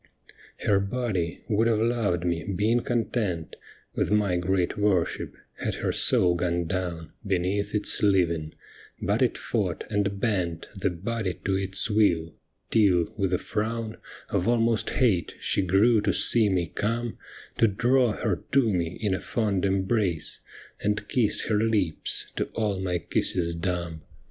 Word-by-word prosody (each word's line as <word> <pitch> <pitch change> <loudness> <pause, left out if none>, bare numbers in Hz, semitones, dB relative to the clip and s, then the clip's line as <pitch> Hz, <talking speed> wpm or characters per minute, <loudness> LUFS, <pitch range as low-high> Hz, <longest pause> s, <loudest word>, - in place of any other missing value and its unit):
Her 100 -2 +4
body 100 -5 -2
would 110 +1 +2
have 115 -2 +2
loved 110 -6 0
me, 85 -1 -1
been 105 +4 +1
content 110 -8 -2 0.4
With - - 0
my 105 -3 +2
great 90 0 0
worship, 100 -5 0 0.2
had - - -2
her - - -1
soul 90 -2 +4
gone 85 0 -1
down 85 -2 -3
Beneath 100 +1 -1
its 105 - +1
living, 85 -6 +1 0.4
but - - 0
it - - +2
fought - - -2
and 100 -1 0
bent 90 -7 -1
The 95 0 0
body 95 +2 -3
to 95 - +1
its 95 0 0
will, 85 -6 +2 0.4
till, 95 -6 +3
with 95 -3 -1
a 90 - +2
frown 110 +2 -3 0.3
Of 90 - 0
almost 115 -1 +2
hate, 105 -10 +1
she - - +1
grew 100 +5 +4
to - - +1
see 110 -3 +4
me 90 -3 +1
come 115 +7 -3 0.4
To 115 - +6
draw 120 +3 +2
her 105 -5 -2
to 125 -6 +4
me 85 -1 -2
in 100 -3 +1
a 95 - -1
fond 100 -5 -1
embrace, 95 -3 0 0.4
And 105 0 -1
kiss 115 -5 +2
her 105 -2 0
lips, 105 -7 -1
to - - +1
all 105 -4 0
my 90 -2 -1
kisses 85 0 0
dumb. 85 -2 -3
100 Hz, 150 wpm, -26 LUFS, 90-110 Hz, 0.4 s, To